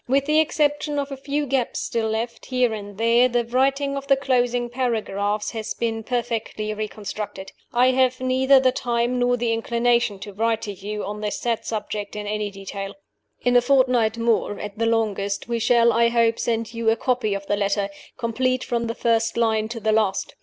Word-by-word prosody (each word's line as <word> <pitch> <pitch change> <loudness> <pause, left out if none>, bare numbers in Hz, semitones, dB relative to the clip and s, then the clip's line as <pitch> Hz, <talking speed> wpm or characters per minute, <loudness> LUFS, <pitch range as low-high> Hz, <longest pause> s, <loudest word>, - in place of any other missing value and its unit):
With 275 +2 +2
the 305 +1 +3
exception 295 -1 +1
of 280 0 -2
a - - -3
few 285 +2 -2
gaps 265 -3 -1
still 225 -1 -1
left, 225 +2 -3
here 250 -3 +1
and 205 -2 -7
there, 235 +3 +4
the 240 -1 0
writing 275 +3 +1
of 275 0 -5
the 275 - +5
closing 245 -3 +1
paragraphs 215 -4 -1
has 220 -2 -4
been 225 -1 -2
perfectly 225 -3 -2
reconstructed. 210 -2 -6 0.2
I 250 +2 +4
have 255 0 +2
neither 260 +1 +4
the 260 -1 +3
time 240 0 -1
nor 245 0 +2
the 235 -1 0
inclination 235 -1 +1
to 205 - -8
write 225 +2 0
to 205 - -4
you 205 +2 -5
on 210 +2 -5
this 210 -1 -2
sad 235 -2 -1
subject 210 -2 -4
in 210 0 -4
any 210 0 -2
detail. 195 0 -7 0.5
In 245 0 +2
a 245 - +7
fortnight 250 -4 +3
more, 230 -3 0
at 205 -1 -6
the 230 - +2
longest, 205 -3 -1
we 235 -1 -1
shall, 235 0 +4
I 235 +1 +4
hope, 230 -1 +2
send 230 -1 -1
you 230 -1 0
a 225 - +4
copy 235 -3 0
of 200 0 -5
the 205 - 0
letter, 200 0 0 0.3
complete 255 +1 0
from 235 -2 -1
the 230 - -3
first 230 -1 +1
line 220 -2 +2
to 230 +1 -6
the 220 0 +1
last. 210 -3 +1
230 Hz, 195 wpm, -23 LUFS, 215-250 Hz, 0.5 s, a